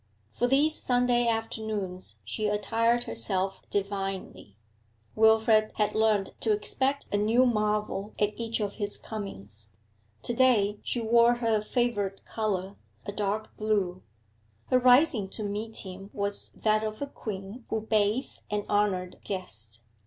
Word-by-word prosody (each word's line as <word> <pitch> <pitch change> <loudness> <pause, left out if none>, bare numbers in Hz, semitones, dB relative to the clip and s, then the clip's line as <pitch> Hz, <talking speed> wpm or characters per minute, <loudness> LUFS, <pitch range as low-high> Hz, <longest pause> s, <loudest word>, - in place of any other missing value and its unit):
For 245 - 0
these 285 +4 +4
Sunday 245 -1 +2
afternoons 220 -5 -3
she 215 -1 -2
attired 230 +3 +1
herself 185 +13 0
divinely; 195 - -4 0.6
Wilfrid 220 0 +4
had 210 -1 +1
learnt 215 -3 +2
to 220 - +1
expect 265 +6 0
a - - +3
new 230 +5 +4
marvel 210 -3 -1
at 210 0 +1
each 230 0 -1
of 205 -2 -3
his 205 -1 0
comings. 105 - -6 0.5
To 240 - 0
day 220 -5 +3
she 240 - -2
wore 235 +1 +5
her 225 -3 +1
favourite 210 -4 -1
colour, 200 -3 -2 0.3
a 205 - -3
dark 210 +1 -2
blue. 200 -4 0 0.7
Her 255 - +5
rising 250 -5 +4
to 215 - -5
meet 210 +2 -3
him 190 +1 -9
was 200 0 -1
that 215 0 +1
of 215 0 -4
a - - -4
queen 210 -1 -7
who 220 - -1
bath 215 +3 0
an 205 0 -2
honoured 195 -3 0
guest. 115 - -3
215 Hz, 140 wpm, -28 LUFS, 195-230 Hz, 0.7 s, wore